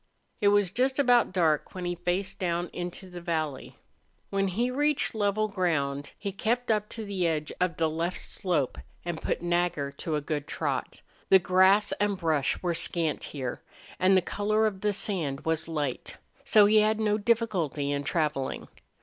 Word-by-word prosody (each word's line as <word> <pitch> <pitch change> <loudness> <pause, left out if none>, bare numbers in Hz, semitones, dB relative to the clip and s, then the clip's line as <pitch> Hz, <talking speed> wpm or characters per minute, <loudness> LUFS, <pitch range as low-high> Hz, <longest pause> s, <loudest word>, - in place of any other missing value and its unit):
It 205 - +2
was 205 -3 +3
just 260 +5 +1
about 245 -6 +4
dark 165 -4 +1
when 180 -1 -4
he 175 - -1
faced 175 +3 -2
down 175 -1 -1
into 180 +2 -6
the 180 -1 -9
valley. 155 -5 -3 0.5
When 195 0 +1
he 235 +7 0
reached 295 +2 +1
level 215 0 +1
ground 145 -8 -1
he 200 -1 -4
kept 235 +5 -1 0.2
to 225 -1 -6
the 190 -4 -1
edge 155 -2 -2
of 180 -3 +1
the 160 - +2
left 165 +3 -2
slope 160 -9 -1 0.3
and 170 -2 -4
put - - -2
Nagger 175 -5 0
to 160 +2 -4
a - - +1
good 145 -1 -3
trot. - - -3 0.3
The 190 - +9
grass 190 +3 +4
and 205 -1 +1
brush 160 -4 0
were 175 -1 +1
scant 165 -2 +1
here, 130 -4 -5 0.4
and 190 +1 +5
the 185 - +2
color 215 +3 +1
of 195 -3 -2
the 210 - +2
sand 185 -9 -2
was 160 0 0
light, 150 -6 -3 0.3
so 210 -2 +6
he 215 +1 +4
had 215 +1 +3
no 210 -1 +1
difficulty 200 - 0
in 145 0 -1
traveling. 150 -4 -2
180 Hz, 175 wpm, -28 LUFS, 160-205 Hz, 0.5 s, The